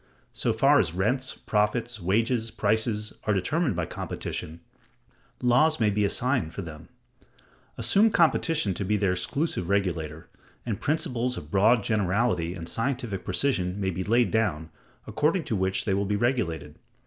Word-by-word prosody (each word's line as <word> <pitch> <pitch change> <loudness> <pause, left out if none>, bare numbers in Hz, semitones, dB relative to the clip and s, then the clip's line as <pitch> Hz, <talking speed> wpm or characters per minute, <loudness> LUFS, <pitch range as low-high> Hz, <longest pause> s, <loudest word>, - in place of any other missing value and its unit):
So - - 0
far - - +4
as 80 - 0
rents, 125 +8 0
profits, 110 +2 -1
wages, 115 +5 +1
prices, 110 0 0
are 105 - +2
determined 140 - 0
by 85 -1 -1
competition, 80 +1 -6 0.8
laws 130 +6 +4
may 105 -2 +3
be 105 +1 +1
assigned 120 - 0
for 100 - -4
them. 80 -1 -10 0.9
Assume 215 +3 +4
competition 165 - +2
to 95 - -4
be 105 +2 +1
their 100 -2 +1
exclusive 90 - -2
regulator, 85 -6 -1 0.4
and 110 -5 -3
principles 125 -5 -1
of 75 +1 -9
broad 110 +3 +4
generality 100 -4 0
and 85 -2 -7
scientific 115 -5 -2
precision 95 -9 0
may 95 -1 0
be 90 +1 -3
laid 120 +4 +2
down, 80 -8 0 0.3
according 165 +4 +1
to 115 - -2
which 95 0 0
they 100 - +1
will 100 +1 0
be 105 - 0
regulated. 115 -7 -1
105 Hz, 150 wpm, -26 LUFS, 95-125 Hz, 0.9 s, far